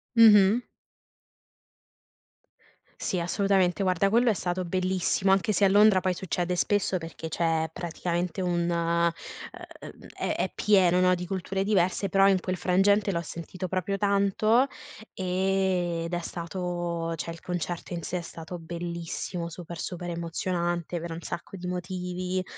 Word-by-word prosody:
Mh-mh. 220 0 +7 2.4
Sì, 185 - -1
assolutamente, 190 +1 +1
guarda, 185 +1 +2
quello 235 +2 +4
è - - +4
stato 180 -1 -2
bellissimo, 185 +1 +1
anche 195 +2 +2
se 200 - +1
a 195 - +6
Londra 205 -1 +6
poi 185 +1 +1
succede 180 0 -2
spesso 200 0 +1
perché 165 -1 -7
c'è 160 -1 0
praticamente 175 +1 -3
un 175 -1 0
uhm, 170 0 +2 1.1
è - - -1
è - - -1
pieno 185 -3 +4
di 180 - -5
culture 190 +1 -2
diverse, 195 -1 +1
però 195 +1 +5
in 190 -2 +3
quel 185 -1 -2
frangente 200 +2 +3
l'ho 170 - -1
sentito 175 +3 -6
proprio 185 +2 -1
tanto 200 +5 +3 0.5
ed 180 -2 0
è 175 - 0
stato 170 -1 -3
cioè 165 +1 -5
il 165 - -9
concerto 175 0 -4
in 170 - -3
sé 180 - -3
è - - -3
stato 165 +1 -8
bellissimo, 170 +1 -5
super, 170 0 -8
super 175 -1 -5
emozionante 170 0 -2
per 170 +1 -6
un 165 - -7
sacco 175 +3 -6
di 180 -1 -6
motivi, 180 0 -3
180 Hz, 140 wpm, -27 LUFS, 170-190 Hz, 2.4 s, Mh-mh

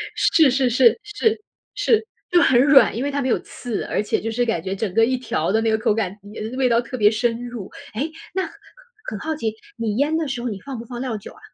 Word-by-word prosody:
是 315 -5 +4
是 255 -1 +2
是， 240 -1 +4
是， 425 +1 0 0.3
是， 445 0 +2 0.2
就 350 -1 +5
很 245 -1 +5
软， 275 -5 +6
因 245 - -2
为 285 - -1
它 285 0 -1
没 260 - -1
有 - - +2
刺， 240 -4 -5
而 - - -1
且 210 - -1
就 225 +1 -3
是 245 +1 0
感 200 -8 -1
觉 190 +1 -3
整 195 -2 -3
个 225 +1 +5
一 255 +1 0
条 185 -9 -1
的 220 +2 +2
那 225 - +1
个 220 - +2
口 215 -1 +1
感 205 -4 -1
嗯， 205 - -12 0.2
那 255 - -6
味 255 -2 +3
道 235 +1 +3
特 255 +2 -7
别 210 -1 +5
深 235 +1 -1
入。 230 -6 -7 0.2
诶， 290 +9 -2 0.2
那 380 0 0
很 325 - -6 0.6
很 210 - -5
好 315 +5 -3
奇， 220 -7 -2 0.2
你 220 -3 -2
腌 300 +3 +2
的 320 - -1
时 255 -3 -3
候 245 - -2
你 200 -2 -5
放 275 -2 -6
不 235 - -8
放 240 0 -6
料 245 -5 -2
酒 205 - -10
啊？ - - -17
240 Hz, 285 characters per minute, -22 LUFS, 220-275 Hz, 0.6 s, 软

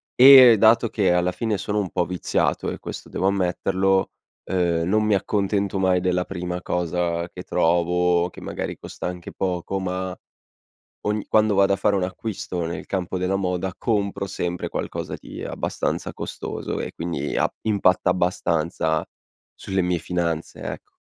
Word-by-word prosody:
E 130 -3 +10
dato 115 +1 +5
che 100 -5 +2
alla 90 +1 +2
fine 110 +1 -1
sono 105 +2 -2
un 100 -3 -2
po' 90 -2 0
viziato 90 -1 -1
e - - -5
questo - - -8
devo 95 - 0
ammetterlo, 95 0 +1 0.3
ehm, 85 -2 0
non 110 +3 +2
mi 105 0 +2
accontento 100 0 0
mai 95 -1 +3
della 90 0 +1
prima 90 -1 -4
cosa 85 0 -1
che 90 - -9
trovo 90 +1 +2
che - - -13
magari - - -4
costa - - -6
anche 90 -1 -6
poco 95 +1 -2
ma 95 0 -3 0.9
ogni 105 0 -1
quando 110 -1 +3
vado 100 0 +4
a - - -2
fare 100 +1 +2
un 95 - 0
acquisto 95 -2 -4
nel 85 - -5
campo 95 -1 -2
della 90 +1 0
moda 90 -1 -2
compro 100 -4 -1
sempre 90 -2 -3
qualcosa - - -4
di - - -8
abbastanza - - -3
costoso. - - -5
E - - -4
quindi 80 -4 -3
a - - +3 0.2
impatta 95 -4 +2
abbastanza 85 -3 0 0.5
sulle 95 -1 -2
mie 90 -1 0
finanze, 85 -1 -3
ecco. - - -7
90 Hz, 155 wpm, -23 LUFS, 90-100 Hz, 0.9 s, E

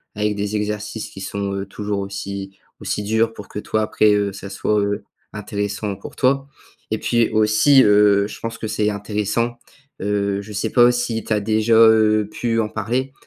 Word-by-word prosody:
avec 105 0 0
des 105 +1 -3
exercices 105 +1 -4
qui 95 - -11
sont, 100 0 -3
heu, 100 0 -3
toujours 105 +1 -4
aussi 100 0 -6 0.2
aussi - - -2
durs». 110 +2 +1
Pour 105 - -10
que, - - -9
toi, 110 +1 -1
après, 105 0 +3
heu, 100 -1 0
ça 100 0 -8
soit, 105 +2 0
heu, 100 +1 -2 0.3
intéressant 105 0 -3
pour 100 - -11
toi 135 +1 +2 0.5
et - - 0
puis 120 -1 +1
aussi, 110 +6 +5
heu, 105 -1 +4
je - - -10
pense 115 0 -5
que 110 - -5
c'est 105 -1 0
intéressant, 105 +3 -2 0.4
heu, 100 0 -1
je 105 +1 -11
sais 105 +2 -2
pas 120 -1 +6
si 120 -2 -2
tu - - -11
as 105 - +2
déjà, 110 +2 +1
heu, 110 -2 +5
pu 115 0 -1
en 110 - +1
parler 125 +6 -2
105 Hz, 190 wpm, -20 LUFS, 100-110 Hz, 0.5 s, pas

